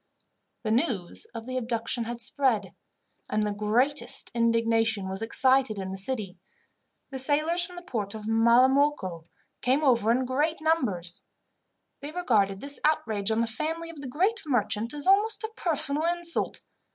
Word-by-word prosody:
The 215 - -1
news 225 - 0
of 225 -1 -6
the 255 +1 -4
abduction 230 -1 -2
had 235 +1 -5
spread, 225 -9 +2 0.6
and 215 - 0
the 210 - -1
greatest 230 +8 +1
indignation 230 -3 +1
was 190 +2 -4
excited 260 0 +2
in 190 -1 -5
the 190 - -5
city. 195 -4 -2 0.7
The 265 - -4
sailors 305 +6 +3
from 360 - -13
the 350 - -9
port 220 - -4
of 215 -1 -8
Malamocco 235 - +2 0.4
came 265 +5 +1
over 235 -6 +3
in 255 +2 +1
great 295 +6 -1
numbers. 220 - -1 0.8
They 290 +2 -6
regarded 215 - +1
this 280 -1 0
outrage 220 -9 +1
on 220 +1 +1
the - - +1
family 320 +9 -4
of 310 -4 -11
the 270 - -6
great 375 - 0
merchant 230 -3 0
as 295 -1 -6
almost 415 +4 +3
a 440 - -4
personal 310 -2 +2
insult. 345 0 -1
245 Hz, 155 wpm, -27 LUFS, 215-295 Hz, 0.8 s, sailors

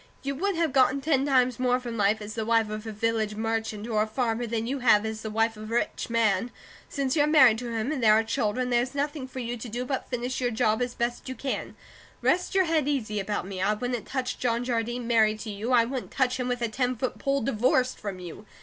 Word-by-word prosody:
You 275 0 -2
would 385 +7 -1
have 330 -4 0
gotten 265 0 +4
ten 275 -1 +1
times 255 -3 +3
more 250 0 +2
from 240 -2 -6
life 210 0 +1
as 210 +1 -7
the 225 - -2
wife 225 -1 +2
of 215 +1 -5
a - - -3
village 220 0 -1
merchant, 220 -1 -2
or 215 -2 +1
a 215 - +1
farmer, 235 0 -1
than 225 0 -2
you 270 +3 -2
have 220 -4 +4
as 220 0 -4
the 220 - -4
wife 225 +1 +1
of 215 +1 -8
a - - -1
rich 240 - -1
man. 230 -1 +2 0.4
Since 275 -2 -1
you're 295 -1 +3
married 260 -8 +6
to 245 -1 -5
him, 230 +4 -1
and 290 -4 -2
there 215 -2 +6
are 220 - +3
children, 250 +1 -1
there's 245 +3 +1
nothing 285 -1 -2
for 260 - -12
you 245 -1 -3
to 235 +1 -7
do 245 +3 -3
but 265 0 -3
finish 250 +1 -3
your 245 - +1
job 220 0 +1
as 245 0 -2
best 240 +1 -2
you 260 - -4
can. 270 0 -4 0.5
Rest 360 +2 +1
your 380 -1 +4
head 320 -4 +1
easy 220 -8 -1
about 205 -1 -2
me. 190 -1 -5
I 210 +2 +2
wouldn't 245 +1 -3
touch 255 -2 -3
John 235 -1 0
Jardine 240 0 -2
married 220 -2 +3
to 215 - -5
you; 210 +5 -4
I 235 -2 +5
wouldn't 255 +1 -4
touch 260 -1 0
him 250 - -1
with 245 -1 -2
a - - +2
ten 250 +3 -1
foot 250 +2 -3
pole, 275 0 0
divorced 250 +2 +1
from 200 -3 -5
you. 180 +4 -9
240 Hz, 250 wpm, -27 LUFS, 220-260 Hz, 0.5 s, married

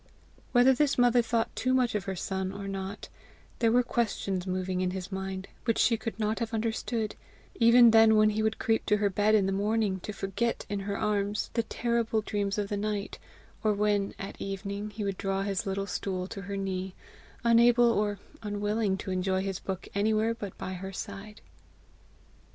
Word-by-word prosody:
Whether 250 +1 +6
this 285 +2 +1
mother 245 0 +5
thought 230 -1 -1
too 255 0 +1
much 250 -2 +2
of 205 -4 -2
her 195 - -3
son 190 +1 -3
or 200 0 -6
not, 195 +1 -5 0.5
there 230 -2 +3
were 245 +1 +4
questions 200 -6 -1
moving 185 0 -1
in 185 - +1
his 185 +1 -5
mind 190 0 -4 0.2
which 230 -2 +1
she 235 - +4
could 225 0 -5
not 215 0 0
have 230 -1 -2
understood 225 0 -2 0.4
even 235 0 +7
then 225 0 +7
when 215 0 +5
he 215 +1 -1
would 220 0 0
creep 225 0 +1
to 210 - +4
her 205 -1 +1
bed 205 +3 +3
in 205 -3 +3
the 195 - 0
morning 205 0 0
to 210 - -6
forget 200 +4 -2
in 205 -1 -2
her 200 0 -3
arms 210 -1 -1
the 230 - +2
terrible 230 -1 0
dreams 205 -1 -2
of 205 -1 -1
the 205 - -1
night, 205 -1 -3 0.4
or 215 -1 +3
when 205 -1 0
at 195 - -8
evening 200 +1 -4
he 210 0 -5
would 195 -2 -3
draw 195 0 -1
his 195 -1 -2
little 195 0 -1
stool 190 -2 -3
to 195 - -6
her 200 0 -5
knee, 190 -1 -3 0.5
unable 235 0 +5
or 205 -2 0 0.2
unwilling 205 -1 -1
to 190 0 -5
enjoy 190 +1 0
his 195 -1 -3
book 190 -2 -5
anywhere 215 +2 +2
but 205 -4 -7
by 185 - -5
her 190 +1 -6
side. 200 +1 -8
205 Hz, 190 wpm, -29 LUFS, 195-225 Hz, 0.5 s, even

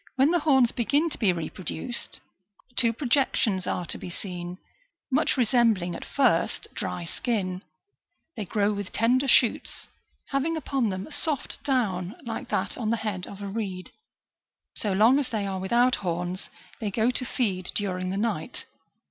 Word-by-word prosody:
Y/hen 270 +4 +5
the 350 - +3
horns 265 -6 +4
begin 290 +7 +1
to - - +1
be 205 -5 +4
reproduced, 175 +7 -4 0.6
two 235 -2 +4
projections 235 -6 +1
are 180 - -1
to - - -5
be - - -6
seen, 180 -1 -6 0.5
much 290 +2 +2
resembling, 225 -7 +3
at - - -6
first, 245 -12 +2
dry 175 - -3
skin; 185 -2 -2 0.7
they 220 - -3
grow 205 +2 +1
with 200 -2 -5
tender 255 +4 +3
shoots, 240 -2 +3 0.4
having 295 +4 0
upon 270 -7 0
them 185 0 -3
a - - -13
soft 290 -1 -2
down 205 -8 0
like 225 -1 -4
that 195 +5 -1
on 220 -3 -1
the 230 - +2
head 190 -4 -2
of 200 0 -8
a - - -3
reed. 195 -3 -4 0.8
So 210 - -1
long 225 +8 +5
as 270 -3 -1
they 215 -4 -1
are 190 -1 -2
without 240 +6 +3
horns, 175 0 -3 0.3
they 215 - -1
go 220 +4 +2
to 255 - +1
feed 195 -7 -1
during 185 -3 -1
the 190 - -2
night. 205 -7 -2
215 Hz, 165 wpm, -27 LUFS, 185-255 Hz, 0.8 s, Y/hen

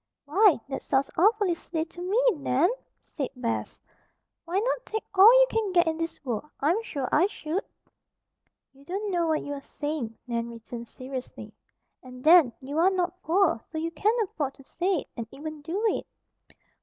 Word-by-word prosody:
"Why, 370 - +5
that 275 - -4
sounds 270 0 0
awfully 410 0 +3
silly 325 -1 -4
to 350 +1 -12
me, 415 +8 +1
Nan!" 285 - +2 0.3
said 275 -5 -4
Bess. 235 -2 -3 0.7
"Why 345 +3 -2
not - - 0
take 440 -2 -4
all 395 +4 +9
you - - +7
can 440 -3 0
get 345 -1 +5
in 320 -1 -1
this 330 -3 -5
world? 250 +4 -3
I'm 335 +10 +2
sure 280 - -4
I 340 +5 +4
should." 350 -1 -3 1.1
"You 275 +1 -19
don't 395 +6 -3
know 345 -2 +1
what 315 -1 +1
you 285 - -4
are 280 - -6
saying," 290 -6 -4
Nan 235 -1 -2
returned 235 +1 -8
seriously. 255 +2 -8 0.5
"And, 255 0 -12
then, 320 -5 +7
you 285 +4 -3
are 355 +3 +5
not 365 -1 -2
poor, 330 - +2
so 320 - -5
you 330 +1 -2
can 415 +8 +1
afford 290 -8 -4
to 275 - -16
say 350 +3 -1
it, - - -15
and 230 -2 -5
even 310 +3 -8
do 335 +6 -3
it." - - -3
320 Hz, 180 wpm, -27 LUFS, 275-375 Hz, 1.1 s, all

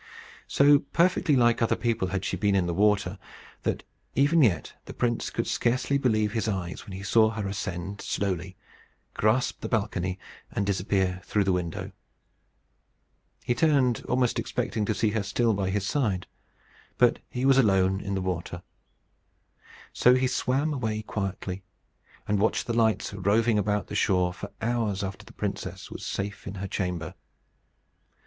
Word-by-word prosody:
So 145 +1 +5
perfectly 170 +1 +2
like 120 -2 +3
other 115 - +3
people 115 -4 0
had 95 +1 -3
she - - -1
been 100 -1 +1
in 95 -2 +2
the 85 - -1
water, 100 0 +2 0.4
that - - -2 0.3
even 145 +4 +4
yet 110 -10 +2
the - - -9
prince 120 -2 0
could - - -2
scarcely 125 +3 +1
believe 110 -5 +2
his 110 -1 -1
eyes 95 -4 -4
when 100 - -8
he 95 +1 -6
saw 110 +2 +4
her 110 -3 -3
ascend 95 0 -4
slowly, 95 -2 -2 0.6
grasp 110 +4 +1
the - - -4
balcony, 95 -4 -1 0.3
and 100 - -1
disappear 95 -1 0
through 105 - +1
the 95 - +1
window. 90 -3 -3 1.5
He 120 - +1
turned, 130 -3 +2
almost 125 -1 +1
expecting 105 - -2
to 110 - 0
see 110 -2 +1
her 110 0 0
still 110 +4 +1
by 100 -2 -1
his 100 0 -1
side. 105 -8 0 0.7
But - - +4
he 125 +1 -2
was 135 0 +6
alone 95 -4 +3
in 100 0 -3
the 95 - -1
water. 90 -1 -4 1.3
So 125 +1 +5
he 130 0 +2
swam 135 +4 0
away 110 -5 -2
quietly, 95 -2 -4 0.7
and 105 -1 +1
watched 110 - +1
the 120 - -2
lights 110 -3 +1
roving 105 +3 +2
about 105 0 0
the - - -9
shore 90 -3 +2
for - - -8
hours 110 -4 0
after 95 0 -6
the - - -12
princess - - -5
was - - -7
safe 100 +1 -4
in 100 - -5
her 100 +1 -4
chamber. 90 -3 -3
105 Hz, 160 wpm, -27 LUFS, 95-120 Hz, 1.5 s, was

